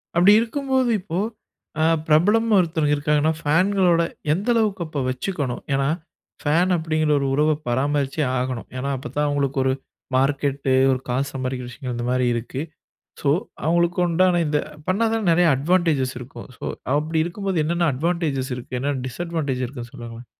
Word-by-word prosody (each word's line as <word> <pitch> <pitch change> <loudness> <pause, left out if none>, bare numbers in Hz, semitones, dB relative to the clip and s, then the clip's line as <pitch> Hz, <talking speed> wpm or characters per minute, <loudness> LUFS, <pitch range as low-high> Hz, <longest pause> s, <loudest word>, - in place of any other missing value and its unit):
அப்படி 180 +4 +6
இருக்கும்போது 260 +2 0
இப்போ, 175 -2 -5 0.6
அ - - +4 0.2
பிரபலம் 205 +9 +4
ஒருத்தர் 160 -4 +1
இருக்காருன்னா 150 +2 +2
ஃபேன்களோட 175 +2 +3 0.3
எந்த 200 +8 -2
அளவுக்கு 210 -5 +1
அப்ப 150 -2 -4
வச்சுக்கணும்? 130 -1 -3
ஏன்னா 135 0 +1 0.5
ஃபேன் 170 +5 +2
அப்படீங்கிற 155 -1 0
ஒரு 140 - -1
உறவ 150 +3 +3 0.2
பராமரிச்சே 140 +3 0 0.2
ஆகணும். 125 -2 -3
ஏன்னா, 135 +2 -2
அப்பத்தான் 150 +2 -2
அவங்களுக்கு 140 -1 -1
ஒரு 130 0 +2 0.4
மார்க்கெட்டு, 140 0 +1 0.2
ஒரு 130 - 0
காசு 135 +3 0
சம்பாறிக்கிற 130 -1 -3
விஷயங்கள் 125 0 -6
இந்த 120 - -3
மாரி 125 -1 +2
இருக்கு. 125 +3 -4 0.6
ஸோ 140 - +1 0.4
அவங்களுக்கு 170 +1 +2
உண்டான 175 +1 +3
இந்த 150 -1 +1 0.3
பண்ணாதானே 225 +3 +1
நெறைய 175 +1 +4
அட்வான்டேஜஸ் 150 -3 +1
இருக்கும். 125 +2 -10
ஸோ - - -42 0.3
அப்படி 155 +2 -1
இருக்கும்போது, 190 +2 -3
என்னென்ன 170 0 +1
அட்வான்டேஜஸ் 150 -3 -1
இருக்கு? 125 0 -6
என்ன 140 +3 0
டிஸ்அட்வான்டேஜ் 145 -2 -3
இருக்குன்னு 120 -2 -8
சொல்லுங்களேன்? 120 -1 -9
150 Hz, 145 wpm, -22 LUFS, 130-175 Hz, 0.6 s, அப்படி